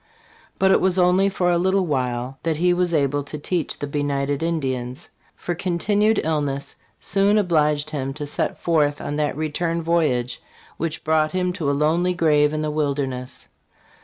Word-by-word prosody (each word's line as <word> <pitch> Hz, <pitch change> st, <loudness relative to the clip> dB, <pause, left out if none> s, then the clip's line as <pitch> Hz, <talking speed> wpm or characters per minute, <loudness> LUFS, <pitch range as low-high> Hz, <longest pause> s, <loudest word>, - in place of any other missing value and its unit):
But 190 Hz, 0 st, +3 dB
it -, -, +4 dB
was 190 Hz, 0 st, +1 dB
only 185 Hz, +2 st, +4 dB
for 180 Hz, -2 st, +1 dB
a 170 Hz, -, +2 dB
little 190 Hz, +1 st, +2 dB
while 125 Hz, -3 st, -2 dB
that 160 Hz, -2 st, -1 dB
he 180 Hz, +2 st, +3 dB
was 175 Hz, -1 st, 0 dB
able 145 Hz, -2 st, +1 dB
to 145 Hz, +2 st, -7 dB
teach 165 Hz, +2 st, -2 dB
the -, -, -4 dB
benighted 140 Hz, 0 st, -1 dB
Indians; 135 Hz, -4 st, -3 dB, 0.2 s
for 175 Hz, -, -4 dB
"continued 200 Hz, +5 st, +1 dB
illness 145 Hz, -3 st, -2 dB, 0.2 s
soon 200 Hz, +2 st, +2 dB
obliged 155 Hz, -6 st, +1 dB
him 135 Hz, -3 st, -3 dB
to 150 Hz, -1 st, -5 dB
set 145 Hz, -, -2 dB
forth 150 Hz, -3 st, +1 dB
on 145 Hz, -, -4 dB
that 150 Hz, -2 st, -1 dB
return 165 Hz, +2 st, -1 dB
voyage 145 Hz, -8 st, 0 dB, 0.4 s
which 160 Hz, -1 st, -3 dB
brought 155 Hz, -1 st, +1 dB
him 180 Hz, -1 st, 0 dB
to 155 Hz, -5 st, -2 dB
a -, -, +2 dB
lonely 170 Hz, +5 st, +1 dB
grave 150 Hz, -3 st, +3 dB
in 155 Hz, 0 st, -2 dB
the 155 Hz, -, -1 dB
wilderness." 140 Hz, -4 st, -3 dB
155 Hz, 170 wpm, -22 LUFS, 145-175 Hz, 0.4 s, it